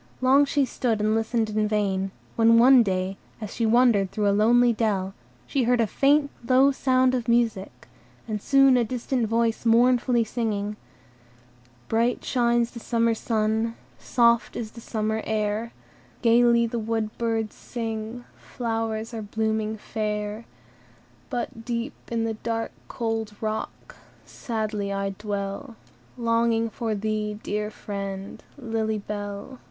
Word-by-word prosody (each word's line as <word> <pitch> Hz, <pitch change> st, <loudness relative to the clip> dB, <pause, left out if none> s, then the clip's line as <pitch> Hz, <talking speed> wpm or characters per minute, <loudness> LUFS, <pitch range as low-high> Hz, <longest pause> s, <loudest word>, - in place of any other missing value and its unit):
Long 270 Hz, +3 st, +5 dB
she 285 Hz, +1 st, +1 dB
looked 260 Hz, -1 st, -4 dB, 0.2 s
and 215 Hz, +1 st, +1 dB
listened 225 Hz, 0 st, 0 dB
in 215 Hz, 0 st, +1 dB
vain; 195 Hz, -2 st, 0 dB, 0.3 s
when 230 Hz, 0 st, +5 dB
one 255 Hz, +2 st, +7 dB
day, 190 Hz, -2 st, -1 dB, 0.2 s
as 215 Hz, -3 st, -6 dB
she 230 Hz, -, 0 dB
was 220 Hz, -, +2 dB
wandering 235 Hz, -5 st, +4 dB
through 205 Hz, +2 st, -1 dB
a -, -, +4 dB
lonely 235 Hz, +4 st, +4 dB
dell, 200 Hz, -4 st, -1 dB, 0.3 s
she 265 Hz, -4 st, 0 dB
heard 245 Hz, +1 st, +3 dB
a 230 Hz, -, +4 dB
faint, 280 Hz, +6 st, +2 dB, 0.2 s
low 265 Hz, +2 st, +6 dB
sound 255 Hz, -1 st, +2 dB
of 245 Hz, -3 st, -1 dB
music, 235 Hz, -5 st, 0 dB, 0.4 s
and 210 Hz, -2 st, -3 dB
soon 275 Hz, 0 st, +5 dB
a 240 Hz, -, +3 dB
distant 245 Hz, 0 st, -1 dB
voice 230 Hz, 0 st, 0 dB
mournfully 240 Hz, +1 st, +4 dB
singing,— 210 Hz, -2 st, -2 dB, 1.1 s
"Bright 230 Hz, +2 st, 0 dB
shines 240 Hz, -1 st, +1 dB
the 235 Hz, -, -8 dB
summer 230 Hz, 0 st, +1 dB
sun, 220 Hz, 0 st, 0 dB, 0.2 s
Soft 235 Hz, -1 st, +2 dB
is 220 Hz, -2 st, -5 dB
the 230 Hz, -, -11 dB
summer 220 Hz, -1 st, -2 dB
air; 215 Hz, +1 st, -1 dB, 0.5 s
Gayly 235 Hz, 0 st, +5 dB
the 235 Hz, +1 st, -3 dB
wood 220 Hz, -1 st, -2 dB
birds 225 Hz, -2 st, -1 dB
sing, 225 Hz, 0 st, -5 dB
Flowers 225 Hz, -1 st, -3 dB
are 225 Hz, -, -4 dB
blooming 220 Hz, +1 st, -2 dB
fair. 210 Hz, +1 st, -4 dB, 0.8 s
"But, 235 Hz, -2 st, -4 dB
deep 235 Hz, +3 st, -3 dB, 0.2 s
in 230 Hz, -1 st, 0 dB
the 225 Hz, 0 st, -1 dB
dark, 225 Hz, +1 st, -3 dB, 0.2 s
cold 225 Hz, -3 st, -3 dB
rock, 220 Hz, 0 st, -5 dB, 0.3 s
Sadly 215 Hz, -3 st, -3 dB
I 195 Hz, 0 st, -1 dB
dwell, 205 Hz, +4 st, -5 dB, 0.4 s
Longing 230 Hz, -1 st, +1 dB
for 225 Hz, 0 st, -2 dB
thee, 210 Hz, 0 st, -2 dB
dear 210 Hz, 0 st, -2 dB
friend, 195 Hz, -2 st, -6 dB
Lily 225 Hz, -4 st, -2 dB
Bell! 205 Hz, +4 st, -6 dB
225 Hz, 140 wpm, -25 LUFS, 215-235 Hz, 1.1 s, one